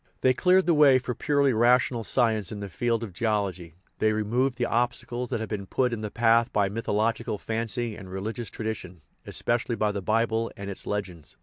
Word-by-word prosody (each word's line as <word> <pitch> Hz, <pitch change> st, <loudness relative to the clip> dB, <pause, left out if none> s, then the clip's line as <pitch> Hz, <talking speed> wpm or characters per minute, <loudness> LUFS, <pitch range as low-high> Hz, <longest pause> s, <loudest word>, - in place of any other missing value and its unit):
They 130 Hz, -, +4 dB
cleared 185 Hz, +7 st, +3 dB
the 175 Hz, -, +3 dB
way 145 Hz, -4 st, +6 dB
for 125 Hz, -1 st, -3 dB
purely 140 Hz, 0 st, +2 dB
rational 120 Hz, +1 st, +3 dB
science 110 Hz, -4 st, +1 dB
in 105 Hz, -, -5 dB
the 100 Hz, -1 st, -6 dB
field 115 Hz, +4 st, -1 dB
of 105 Hz, -5 st, -7 dB
geology; 95 Hz, -6 st, -2 dB, 0.2 s
they 110 Hz, 0 st, +3 dB
removed 120 Hz, +5 st, 0 dB
the 120 Hz, -, 0 dB
obstacles 120 Hz, +1 st, -1 dB
that -, -, -2 dB
had 110 Hz, -, -5 dB
been 100 Hz, -3 st, -4 dB
put 125 Hz, +2 st, 0 dB
in 110 Hz, -, -4 dB
the 105 Hz, -, -3 dB
path 115 Hz, +1 st, +3 dB
by 100 Hz, -2 st, +1 dB
mythological 110 Hz, 0 st, -1 dB
fancy 115 Hz, +1 st, -3 dB
and 95 Hz, -3 st, -10 dB
religious 110 Hz, +5 st, -4 dB
tradition, 95 Hz, -7 st, -6 dB, 0.2 s
espe 120 Hz, +1 st, 0 dB
cially 120 Hz, -, -3 dB
by 105 Hz, 0 st, +1 dB
the 100 Hz, -1 st, -4 dB
Bible 115 Hz, +2 st, 0 dB
and 100 Hz, 0 st, -5 dB
its 95 Hz, -, -4 dB
legends. 90 Hz, -7 st, -5 dB
110 Hz, 200 wpm, -26 LUFS, 105-120 Hz, 0.2 s, way